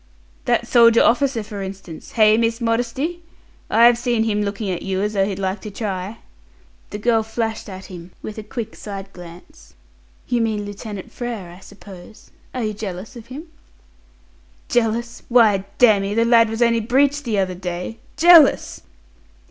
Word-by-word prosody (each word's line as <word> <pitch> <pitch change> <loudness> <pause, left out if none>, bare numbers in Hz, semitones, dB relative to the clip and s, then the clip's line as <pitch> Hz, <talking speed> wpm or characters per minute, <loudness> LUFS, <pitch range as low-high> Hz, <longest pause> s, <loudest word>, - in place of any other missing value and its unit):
"That 240 0 +1
soldier 230 -1 +5
officer, 250 -2 +2
for 210 -1 -7
instance. 190 -4 -9
Hey, 215 -2 +5
Miss 230 +1 0
Modesty? 245 +9 -2 0.5
I've 235 +2 +5
seen 240 -2 0
him 210 -2 0
looking 200 0 -3
at 175 - -4
you 190 -1 -2
as 210 +1 -2
though 195 -2 +2
he'd 195 -1 -4
like 190 +1 -3
to 215 - -7
try." 200 0 -5 0.7
The 210 - -5
girl 225 +1 +2
flashed 220 -1 -4
at 190 0 -9
him 175 -1 -10
with 215 0 -6
a - - -7
quick 220 +1 -6
side 195 -1 -8
glance. 175 0 -14 0.5
"You 240 -1 0
mean 215 -2 -1
Lieutenant 205 -1 -8
Frere, 230 -8 -6
I 175 - -13
suppose. 200 0 -14 0.2
Are 250 - -4
you 215 -1 -2
jealous 200 +1 -7
of 235 -1 -11
him?" 295 +7 -9 1.2
"Jealous! 235 0 -1
Why, 215 -5 +4
damme, 205 -4 +4
the 230 0 +3
lad 230 -1 +5
was 225 +2 0
only 230 -1 +2
breeched 275 +5 +2
the 225 -5 -1
other 190 -1 0
day. 180 +4 -6 0.2
Jealous!" 330 -2 +6
220 Hz, 165 wpm, -20 LUFS, 195-235 Hz, 1.2 s, Jealous